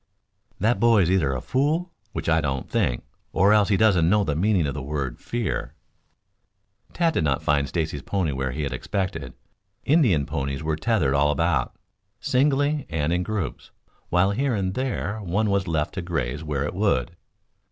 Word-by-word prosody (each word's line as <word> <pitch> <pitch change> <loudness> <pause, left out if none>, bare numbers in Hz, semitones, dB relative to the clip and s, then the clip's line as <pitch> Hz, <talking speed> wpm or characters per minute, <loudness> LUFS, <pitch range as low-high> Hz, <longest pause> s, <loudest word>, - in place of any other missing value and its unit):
"That 110 +1 +2
boy 115 -3 +5
is 85 - +1
either 85 -8 +2
a 65 -2 -3
fool 155 +7 0 0.2
which - - -5
I 80 0 +3
don't 70 -3 -2
think - - 0 0.3
or 100 +3 +4
else 105 -1 +4
he 100 - +3
doesn't 95 -7 +4
know 105 +2 +3
the 75 - -1
meaning 95 0 +2
of 70 - -2
the 75 - -5
word 70 -2 -4
'fear.'" 120 -3 -3 1.2
Tad 170 -2 +1
did - - 0
not 70 -3 0
find 70 -1 +2
Stacy's 80 -2 -2
pony 90 0 -1
where 65 -1 -2
he 75 +4 -3
had 70 -2 -3
expected. 80 -3 -3 0.5
Indian 120 - +3
ponies 70 +2 -3
were 80 0 0
tethered 80 - +1
all 70 +1 +3
about, 75 -3 0 0.4
singly 145 +2 +1
and 80 0 0
in 90 - +1
groups, 100 -1 -4 0.4
while 90 +3 +3
here 130 +3 0
and 95 -2 -1
there 120 -4 -2
one 100 +2 0
was 100 -1 0
left 80 -3 -1
to 95 - -3
graze 80 -5 -3
where 75 -3 -2
it 75 - -3
would. 95 -3 0
85 Hz, 180 wpm, -24 LUFS, 75-105 Hz, 1.2 s, boy